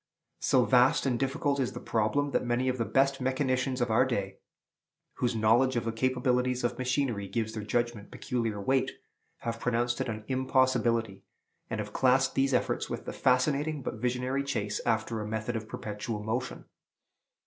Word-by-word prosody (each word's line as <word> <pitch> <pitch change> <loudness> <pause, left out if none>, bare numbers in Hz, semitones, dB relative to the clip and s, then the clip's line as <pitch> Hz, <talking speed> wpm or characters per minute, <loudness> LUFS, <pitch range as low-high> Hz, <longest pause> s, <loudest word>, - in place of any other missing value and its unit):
So 125 -2 +3
vast 125 +1 +4
and 125 -3 +1
difficult 140 +1 0
is 130 - -1
the - - -6
problem, 115 +6 0
that - - +1
many 120 +1 0
of 130 -1 -2
the 115 - +1
best 135 +2 +2
mechanicians 130 -1 0
of 120 -2 +1
our 110 +3 +5
day, 100 -7 -2 0.8
whose 120 -1 0
knowledge 120 +4 +3
of 120 - -1
the 115 - 0
capabilities 125 +1 0
of 120 - -1
machinery 130 -5 0
gives 110 +2 -2
their 110 - -4
judgment 115 0 -2
peculiar 115 -4 -2
weight, 130 +6 +1 0.5
have 115 0 -3
pronounced 120 0 0
it - - -2
an 110 -1 -4
impossibility, 130 -5 +1 0.5
and 110 - -3
have 105 0 -5
classed 130 +1 +3
these 135 0 +2
efforts - - 0
with - - -5
the - - -5
fascinating 140 +3 +1
but 110 - -4
visionary 125 +2 0
chase 105 -7 -2
after 110 -1 0
a 105 - -4
method 110 +2 -3
of 110 -1 -5
perpetual 105 0 -5
motion. 120 +4 -3
125 Hz, 170 wpm, -29 LUFS, 110-130 Hz, 0.8 s, our